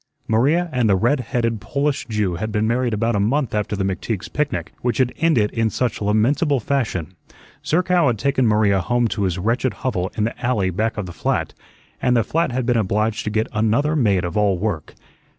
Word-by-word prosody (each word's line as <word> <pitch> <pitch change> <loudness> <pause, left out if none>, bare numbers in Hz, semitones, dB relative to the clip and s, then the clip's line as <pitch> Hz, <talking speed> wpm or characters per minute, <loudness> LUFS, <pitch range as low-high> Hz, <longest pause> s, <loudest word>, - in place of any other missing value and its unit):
Maria 145 +11 +2
and 125 -4 +2
the 100 - +5
red 120 +9 +2
headed 115 -3 -1
Polish 140 +7 -1
Jew 105 -5 -1
had 110 +4 -3
been 105 +1 0
married 120 +2 +1
about 115 +1 0
a - - +1
month 120 +4 0
after 105 0 -1
the 100 - -1
McTeague's 95 +1 -3
picnic 150 0 -2
which 120 -2 0
had 130 -2 +1
ended 150 -11 +2
in 115 -1 0
such 120 0 -2
lamentable 125 +8 +2
fashion. 110 - -2 0.5
Zerkow 180 0 +2
had 120 -3 +1
taken 130 +1 +1
Maria 105 -3 +3
home 120 +5 +1
to 105 -2 -1
his 90 -1 -1
wretched 115 +7 0
hovel 95 -8 -1
in 105 - +1
the 115 - -1
alley 105 -7 +1
back 110 +6 -1
of 105 - -2
the 90 - -8
flat, - - -1 0.5
and 125 -1 +3
the 115 - +3
flat 165 +3 0
had 125 0 -1
been 120 -1 +2
obliged 105 +1 0
to - - 0
get 110 +1 0
another 115 +8 +1
maid 100 - +2
of 85 - -5
all 105 -3 +2
work. 90 -5 -3
115 Hz, 205 wpm, -21 LUFS, 105-130 Hz, 0.5 s, the